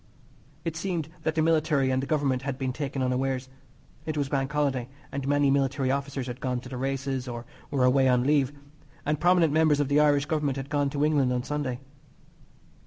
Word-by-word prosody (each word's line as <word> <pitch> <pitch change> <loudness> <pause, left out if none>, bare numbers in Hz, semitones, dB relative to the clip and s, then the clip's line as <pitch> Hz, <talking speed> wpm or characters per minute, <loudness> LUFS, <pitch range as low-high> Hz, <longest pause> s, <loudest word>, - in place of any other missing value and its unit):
It 165 -1 -2
seemed 170 -3 -2
that 160 0 -1
the 160 - +2
Military 155 -4 +2
and 130 0 +1
the 135 - -4
Government 140 -4 +1
had 135 -1 -3
been 130 -2 -2
taken 135 -1 -3
unawares. 130 0 -1 0.5
It 155 -1 -3
was 140 -2 0
Bank 135 -1 -1
Holiday, 135 -4 0 0.2
and 140 0 -4
many 145 -1 +3
military 135 -1 +1
officers 140 -1 -2
had 125 0 -7
gone 125 -1 -1
to 125 - -10
the 130 - -6
races, 135 0 -2
or 120 -1 -6 0.2
were 135 -3 +1
away 130 +1 +4
on 125 -1 +3
leave, 140 -1 +2 0.5
and 150 0 0
prominent 175 -3 +4
members 155 -2 +4
of 145 -2 +1
the 145 +1 +4
Irish 145 -1 +4
Government 150 -3 -1
had 135 +2 -6
gone 145 -2 +1
to 145 +1 0
England 145 -4 +2
on 125 -1 0
Sunday. 140 -3 -3
140 Hz, 200 wpm, -27 LUFS, 130-150 Hz, 0.5 s, away